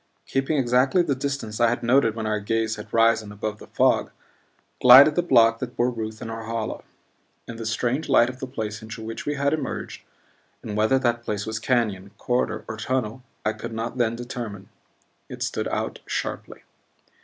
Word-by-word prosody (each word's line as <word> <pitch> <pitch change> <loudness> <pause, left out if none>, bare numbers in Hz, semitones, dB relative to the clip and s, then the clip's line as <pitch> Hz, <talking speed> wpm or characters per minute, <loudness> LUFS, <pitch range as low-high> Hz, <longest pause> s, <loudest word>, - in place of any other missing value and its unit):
Keeping 135 +3 0
exactly 130 +6 +3
the 150 -5 0
distance 130 -5 -4
I 120 -1 +5
had 120 - -2
noted 120 -2 +3
when 110 -1 -4
our 110 0 0
gaze 110 +1 -1
had 105 - -10
risen 115 -2 +3
above 105 +1 -5
the - - -12
fog, - - +2 0.7
glided 130 +5 +9
the 175 - +2
block 115 -8 +4
that 125 -1 -6
bore 125 +1 +2
Ruth 110 -2 -6
and 115 - -6
Norhala. 115 0 -4 0.7
In 115 - -7
the 115 -1 -5
strange 120 +6 -1
light 120 - +5
of 130 +1 -7
the 130 - -5
place 110 -5 -5
into 110 0 -8
which 115 +4 -6
we 145 - 0
had 140 +1 +1
emerged 155 - -4 0.6
and 105 -2 -5
whether 110 +5 +3
that 120 -2 0
place 105 -3 -3
was 110 -1 -3
canyon, 110 -6 0
corridor, 120 -3 -1
or 110 - -5
tunnel 125 0 -2 0.2
I 110 - +1
could - - -7
not 115 +2 -4
then 115 -1 +1
determine 120 -5 -7 0.6
it - - -5
stood - - -2
out - - -3
sharply. - - -4
115 Hz, 185 wpm, -24 LUFS, 110-130 Hz, 0.7 s, glided